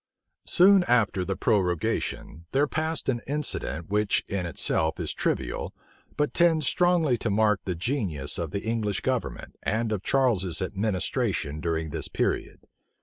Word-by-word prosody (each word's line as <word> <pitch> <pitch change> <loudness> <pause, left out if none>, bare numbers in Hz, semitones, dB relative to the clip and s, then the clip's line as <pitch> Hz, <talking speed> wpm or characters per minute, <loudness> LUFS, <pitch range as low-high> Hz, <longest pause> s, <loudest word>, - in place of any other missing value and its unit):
Soon 190 +1 +6
after 110 - +2
the 95 +1 -2
prorogation, 90 -3 -1
there 140 +2 +4
passed 155 +1 -2
an 120 -3 0
incident, 140 - -3
which 105 -1 +2
in 95 -3 -2
itself 80 0 0
is 80 -4 -2
trivial, 65 -2 -2 0.4
but 150 -1 0
tends 165 -3 +4
strongly 170 -6 +2
to 115 - -1
mark 105 0 +2
the 90 - -2
genius 85 - -2
of 85 -2 -2
the 100 - -4
English 110 -3 -1
government, - - -3
and 110 +1 -1
of 105 -3 -1
Charles's 100 -11 +1
administration 95 -6 -1
during 80 -1 -2
this - - -3
period. - - -2
105 Hz, 145 wpm, -26 LUFS, 85-135 Hz, 0.4 s, Soon